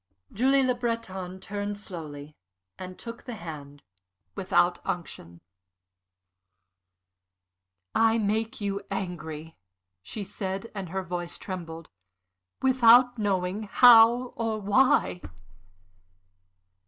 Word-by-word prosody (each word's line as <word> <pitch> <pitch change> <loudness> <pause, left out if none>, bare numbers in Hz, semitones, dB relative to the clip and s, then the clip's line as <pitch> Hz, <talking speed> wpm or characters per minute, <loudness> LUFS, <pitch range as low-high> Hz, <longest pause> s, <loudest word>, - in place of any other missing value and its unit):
Julie 265 +5 +3
Le 255 -1 +2
Breton 190 -7 -4
turned 205 +1 -5
slowly 155 -7 -9 0.4
and 185 0 -8
took 230 0 -9
the 245 - -6
hand 145 -6 -9 0.5
without 180 -2 +1
unction. 85 - -6 2.5
"I 225 0 +3
make 220 +3 -1
you 200 -1 -2
angry," 160 -5 -6 0.4
she 205 - -6
said, 195 +2 -5
and 195 -4 -6
her 190 +2 -3
voice 175 -1 -5
trembled, 165 -4 -8 0.7
"without 245 -1 +5
knowing 200 0 -1
how 240 +1 +7
or 225 -2 -2
why." 205 - +2
200 Hz, 90 wpm, -27 LUFS, 175-230 Hz, 2.5 s, how